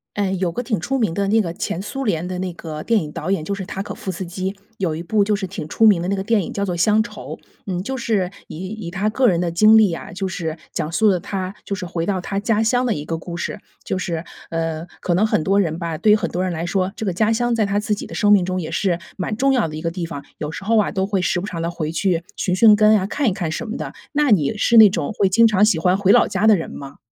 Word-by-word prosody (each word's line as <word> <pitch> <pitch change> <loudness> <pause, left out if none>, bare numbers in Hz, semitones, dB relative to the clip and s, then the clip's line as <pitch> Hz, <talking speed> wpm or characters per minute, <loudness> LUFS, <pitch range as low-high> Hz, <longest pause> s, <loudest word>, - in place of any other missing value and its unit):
呃， 200 -2 0
有 180 -2 -1
个 245 - -3
挺 230 -3 -1
出 270 +11 -2
名 220 -9 +1
的 200 +3 -1
那 220 +3 +3
个 170 -4 -4
前 170 +1 -3
苏 270 +6 -4
联 175 -7 0
的 185 -1 -4
那 185 -1 -3
个 155 -2 -7
电 230 -2 +2
影 150 - -6
导 165 +4 -3
演 165 -6 -1
就 200 - -4
是 195 -2 -4
塔 195 - -4
可 - - -7
夫 190 - -5
斯 185 +2 -5
基， 185 +2 -4 0.2
有 175 -5 -1
一 160 - -5
部 205 +4 +2
就 210 +1 +1
是 200 -1 -3
挺 180 -4 -5
出 225 - +1
名 200 -5 +5
的 175 - -3
那 195 - 0
个 190 - -2
电 220 +1 +2
影 - - -6
叫 200 - -2
做 180 -3 -2
乡 210 +5 +3
愁， 220 - -8 0.3
嗯， 180 -2 -2
就 265 +6 -4
是 215 -7 0 0.2
以 - - -9
以 205 -4 -6
他 200 +3 0
个 255 +4 +2
人 175 -6 +3
的 175 -1 0
经 215 +6 +6
历 215 -5 +5
啊， 165 - -7
就 190 +2 -3
是 165 -4 -4 0.2
讲 160 0 -3
述 215 +5 +3
了 185 - +2
他 185 +1 -4
就 200 - -3
是 190 -1 -5
回 170 -1 -3
到 195 -2 0
他 195 +2 -3
家 220 +1 +1
乡 245 +3 +2
的 230 - +1
一 145 - -5
个 165 +1 -3
故 170 +1 -7
事。 170 - -4 0.3
就 190 - -2
是， 170 -2 -3 0.3
呃， 165 0 -3
可 175 - 0
能 205 +5 +3
很 160 - +1
多 195 +3 +2
人 165 -2 -1
吧， 165 -2 -3
对 210 - +4
于 - - +6
很 210 - -3
多 180 +1 -1
人 185 - -1
来 165 0 -3
说， 185 +1 -1
这 - - -5
个 190 - 0
家 215 +5 +2
乡 240 +1 0
在 215 -2 +2
他 200 +1 0
自 210 0 -2
己 - - -6
的 - - -9
生 205 0 +3
命 195 -3 +5
中 185 0 -2
也 160 - -5
是 180 -4 0 0.2
蛮 200 +3 -3
重 270 +3 +2
要 250 -7 +2
的 155 - -7
一 155 - -6
个 165 - -1
地 170 0 -4
方， 145 -4 -7
有 150 0 -4
时 - - -7
候 225 +3 +2
啊， 210 - +1
都 190 -1 0
会 195 -1 0
时 180 - 0
不 190 - -5
常 175 -6 -5
地 165 +1 -1
回 155 -2 -3
去 170 0 0
寻 190 -2 0
寻 210 +2 +7
根 215 0 +5
啊， 190 -2 0
看 275 +5 0
一 - - +2
看 180 -4 -3
什 225 +8 -4
么 220 - -4
的， - - -5 0.2
那 295 -2 +2
你 160 -5 +3
是 235 +3 +2
那 220 -2 +10
种 195 - -2
会 200 -2 +2
经 230 +5 +5
常 210 -1 +4
喜 215 -4 +3
欢 180 +3 +2
回 200 0 +4
老 - - +5
家 195 +2 0
的 220 - +7
人 165 - -5
吗？ 140 0 -9
190 Hz, 330 characters per minute, -21 LUFS, 170-215 Hz, 0.3 s, 那